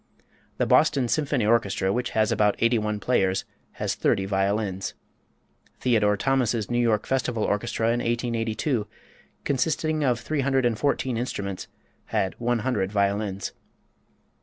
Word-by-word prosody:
The - - +1
Boston 130 -3 +3
Symphony 140 -3 0
Orchestra, 100 -4 +2
which 125 0 -1
has 110 -1 +3
about 105 -1 +3
eighty 115 0 +3
one 105 0 -2
players, 95 -4 +1 0.3
has - - -2
thirty 95 - +1
violins. 95 0 -1 0.8
Theodore 105 -5 +2
Thomas's 120 -2 0
New 120 - +1
York 115 -3 +2
Festival 125 -4 0
Orchestra 110 +2 -1
in 120 +1 +1
1882, 115 0 -1 0.6
consisting 155 +3 0
of 125 -4 +2
three 150 +3 -2
hundred 135 -1 +1
and 120 -2 +2
fourteen 130 -1 0
instruments, 100 -5 -4 0.4
had 95 - -1
one 120 -1 0
hundred 100 -7 0
violins. 100 -1 -1
115 Hz, 135 wpm, -25 LUFS, 105-125 Hz, 0.8 s, Boston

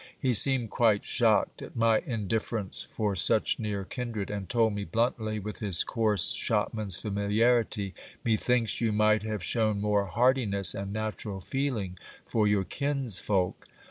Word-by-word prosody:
He 130 -2 +1
seemed 125 -1 +4
quite 110 -4 +2
shocked - - +1
at - - -10
my 115 -1 +3
indifference 110 -2 -3
for 105 -3 -3
such 85 - +3
near 105 -3 -3
kindred, 115 -4 -5
and 100 -3 -5
told 115 -2 +2
me 100 0 -3
bluntly, 110 +3 -1
with 105 +1 -6
his 100 -6 +1
coarse 110 -4 +2
shopman's 100 -5 -1
familiarity, 105 0 +1 0.3
Methinks 115 -1 +1
you 115 -2 +1
might 105 0 +3
have 105 -3 -4
shown 110 -3 +1
more 105 -1 +1
heartiness 110 -4 +2
and 100 0 -5
natural 110 -1 -4
feeling 110 -5 -3 0.3
for 110 -2 +1
your 105 -2 +2
kinsfolk 115 -8 0
110 Hz, 140 wpm, -28 LUFS, 100-115 Hz, 0.3 s, seemed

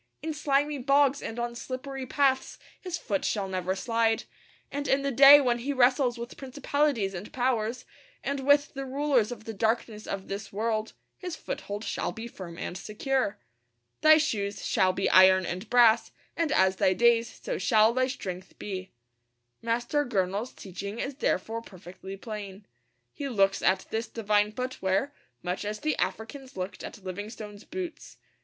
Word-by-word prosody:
In 315 0 -2
slimy 290 -1 +1
bogs 275 +1 +3
and 225 - -6
on 240 0 -2
slippery 260 +2 -6
paths 265 -1 +1 0.2
his 360 -2 -4
foot 200 -10 -2
shall 200 -3 -1
never 185 0 -2
slide; 230 +1 +1 0.5
and 285 0 -3
in 275 +1 +2
the 280 - 0
day 275 +3 +10
when 245 -3 +1
he 280 +4 -2
wrestles 250 -1 +3
with 235 +1 -7
principalities 270 -5 0
and 185 +3 -7
powers, 245 -2 -1 0.4
and 280 0 -2
with 285 +2 +3
the 275 -1 -4
rulers 265 -4 +1
of 225 -3 -7
the 225 0 -6
darkness 220 0 -1
of 195 -1 -4
this 200 +1 -5
world, 220 +1 -1 0.3
his 360 -4 -5
foothold 205 -7 -5
shall - - -2
be 225 +1 -7
firm 175 -7 -9
and 180 - -5
secure. 255 +2 -1 0.6
'Thy 310 0 +8
shoes 210 -10 -1
shall 185 0 +3
be 190 +1 -1
iron 185 0 +7
and 185 +5 -5
brass, 235 -2 +5 0.3
and 330 -3 0
as 190 -7 +3
thy 185 - +3
days 235 +3 +2
so - - -2
shall 220 -1 +4
thy 255 +1 +2
strength 190 -8 -6
be.' 190 -2 -5 0.7
Master 240 +6 0
Gurnall's 200 -1 -1
teaching 200 +3 -7
is 275 +4 -3
therefore 225 -3 -1
perfectly 190 -1 -10
plain. 205 -2 -7 0.5
He 280 -1 -4
looks 195 -5 +2
at 190 - +2
this 225 +1 -2
divine 210 -2 +1
footwear 255 0 -1 0.3
much 180 +3 -2
as 210 +1 -4
the 310 0 0
Africans 260 +3 -4
looked 185 +1 -5
at 205 - -9
Livingstone's 205 +2 -7
boots. 360 -1 -7
230 Hz, 165 wpm, -28 LUFS, 200-270 Hz, 0.7 s, day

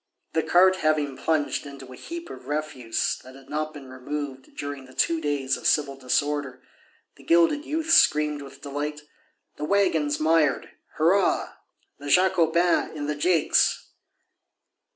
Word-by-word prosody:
The 160 - +2
cart 185 +3 +4
having 155 -4 0
plunged 150 -1 -1
into 135 -2 -11
a - - -10
heap 340 - -8
of - - -11
refuse 145 -6 -2
that 130 +1 -13
had 135 +1 -16
not 155 +1 -2
been 145 -3 -11
removed 130 +1 -7
during 145 -2 -6
the 130 - -17
two 165 -1 +1
days 140 -3 -1
of - - -2
civil 140 -2 +1
disorder, 135 +1 -2 0.5
the - - -16
gilded 170 - +3
youth 320 +1 -2
screamed 150 - +4
with 140 0 -12
delight: 150 +1 -4 0.6
"The 150 - -3
waggon's 160 -6 +1
mired.... 155 -3 +2 0.2
Hurrah! 180 +5 +2 0.5
The 145 - -9
Jacobins 175 -1 +3
in 145 - -4
the 150 0 -2
jakes!" 165 +2 +2
150 Hz, 145 wpm, -25 LUFS, 140-165 Hz, 0.6 s, cart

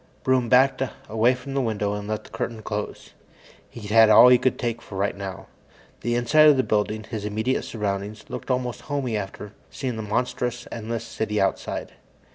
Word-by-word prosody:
Broom 130 -2 +2
backed 130 +1 +4 0.3
away 115 +4 +3
from 135 +2 -8
the 135 - +1
window 105 -4 -1
and 105 0 -5
let 110 0 -3
the - - -16
curtain 115 -2 -4
close. 105 0 -5 0.6
He'd 105 -3 -9
had 110 0 +7
all - - +9
of 125 - +9
that - - +8
he - - +7
could 130 - +1
take 115 -2 -3
for 95 - -9
right 100 +1 0
now. 100 -1 -7 0.5
The 120 0 -1
inside 150 +6 +5
of 145 - +5
the 130 - +3
building, 110 0 0
his 110 -1 -6
immediate 110 +5 -1
surroundings, 105 0 -4
looked - - -7
almost 125 -2 -1
homey 135 -5 -1
after 105 0 -5 0.2
seeing 125 -4 -4
that - - -3
monstrous, 125 +1 -2
endless 115 0 -4
city 110 -2 -2
outside. 95 - -1
115 Hz, 195 wpm, -24 LUFS, 105-125 Hz, 0.6 s, all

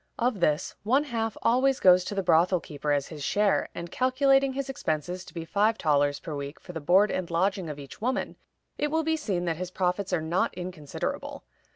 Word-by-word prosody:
Of 240 -3 0
this, 155 -1 +1
one 260 +7 +2
half 225 -6 -3
always 260 +3 +3
goes 180 -1 +6
to 205 - -4
the 195 - 0
brothel 175 +1 +4
keeper 150 -2 -4
as 140 -1 0
his 150 -3 -7
share, 205 +6 +1
and, 170 0 -6
calculating 270 +1 +3
his 275 0 -3
expenses 180 - -3
to - - -14
be 165 -1 -4
five 210 +5 +2
thalers 145 -2 +2
per 165 - -7
week 140 +1 -6
for 180 - -11
the 160 - -5
board 190 +7 +4
and 185 -2 -3
lodging 185 +1 0
of 150 - -6
each 140 +7 -11
woman, 255 +3 -1 0.4
it 295 - +1
will 320 +2 +1
be 320 +1 +1
seen 195 - -2
that 165 -2 -1
his 180 0 -4
profits 185 +1 -1
are 180 - +2
not 165 +4 0
inconsiderable. 175 -5 -5
185 Hz, 210 wpm, -27 LUFS, 160-230 Hz, 0.4 s, goes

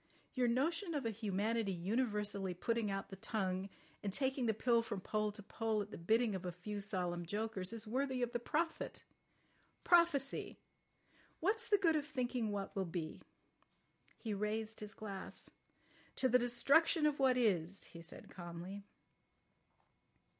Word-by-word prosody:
Your 255 -2 +2
notion 325 - +1
of 280 -4 -1
a 225 - +1
humanity 215 0 0
universally 205 0 -1
putting 230 +3 0
out 195 0 -3
the 195 - -8
tongue 190 -2 -1 0.3
and 200 - -2
taking 265 +2 +1
the 220 - +3
pill 235 +1 +4
from 210 -3 -4
pole 215 +2 0
to 210 0 -10
pole 220 +1 -1
at 205 - -13
the - - -6
bidding 220 +6 +3
of 190 -1 -3
a 180 - -2
few 205 +4 -5
solemn 180 -4 -1
jokers 205 +1 -2
is 230 -2 -2
worthy 260 +2 0
of 240 - -1
the 240 - -1
prophet. 320 +7 -2 0.8
Prophecy! 335 -6 +3 0.8
What's 435 +7 +1
the 410 - +6
good 335 -5 +3
of 300 -1 0
thinking 250 -4 -1
of - - -2
what 200 -1 -3
will 195 -1 0
be!" 165 -2 -4 1.0
He 220 -3 -3
raised 215 +2 -2
his 210 -1 -6
glass. 200 -3 -6 0.6
"To 260 - +3
the 250 0 +5
destruction 280 +7 +4
of 295 -1 +2
what 260 -2 +5
is," 195 -6 +1
he 170 - -11
said 170 - -11
calmly. 175 +3 -7
220 Hz, 160 wpm, -37 LUFS, 195-255 Hz, 1.0 s, the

